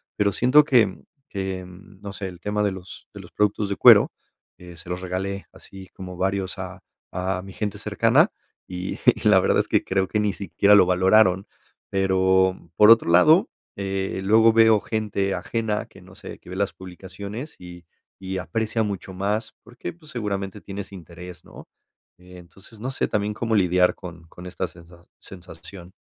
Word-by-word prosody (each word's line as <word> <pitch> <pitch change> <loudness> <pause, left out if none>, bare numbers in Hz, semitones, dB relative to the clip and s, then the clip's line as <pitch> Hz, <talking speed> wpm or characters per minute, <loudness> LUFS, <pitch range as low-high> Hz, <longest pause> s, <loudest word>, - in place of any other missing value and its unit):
pero 100 -1 +1
siento 130 +8 +5
que 115 -9 +2 0.3
que, 95 -2 -4
no 95 +2 -12
sé, 95 0 -5
el 90 -2 -10
tema 105 +3 -2
de 100 - +1
los 95 -1 -11
de - - -10
los - - -15
productos 105 0 0
de 100 - -2
cuero, - - +7 0.5
eh, 90 -1 -12
se 85 +1 -12
los 90 0 -4
regalé 95 +2 -4
así 95 -1 -13
como 95 -1 -9
varios 95 0 -2
a - - -7 0.3
a 90 +1 -2
mi 95 +1 -11
gente 105 -1 -4
cercana, - - +2 0.4
y 90 0 -5 0.2
y - - -2
la - - +6
verdad - - +2
es - - 0
que - - +1
creo 95 0 0
que 105 - -1
ni 105 -1 +1
siquiera 100 +2 +3
lo 100 - +6
valoraron. 95 +1 +3 0.4
Pero, 95 -1 +2 0.2
por 105 - +7
otro 115 -6 +5
lado, 155 - +5 0.3
eh, 95 -1 -3
luego 110 +3 +5
veo 110 -1 +5
gente 105 -3 -2
ajena 110 -1 -2
que, - - -17
no - - -16
sé, - - -10
que - - -16
ve 90 - -7
las 100 0 -1
publicaciones 100 - -9
y 90 -1 -12 0.4
y 95 0 -4
aprecia 110 +6 -2
mucho 100 -2 -5
más 105 +4 -2
porque, 120 +2 -8
pues, 160 -2 -16
seguramente 100 -4 -4
tienes 100 0 -8
interés, 90 -1 -11
¿no? - - -14 0.5
Eh, 90 0 -15
entonces, 95 +5 -16
no 125 +4 -4
sé 135 - -1
también, 105 0 -1
¿cómo 115 +1 -2
lidiar 90 -2 +3
con 85 -2 -11
con 90 - -12
esta 90 0 -4
sensa 85 0 -17 0.2
sensación? 90 0 -12
95 Hz, 180 wpm, -23 LUFS, 90-105 Hz, 0.5 s, cuero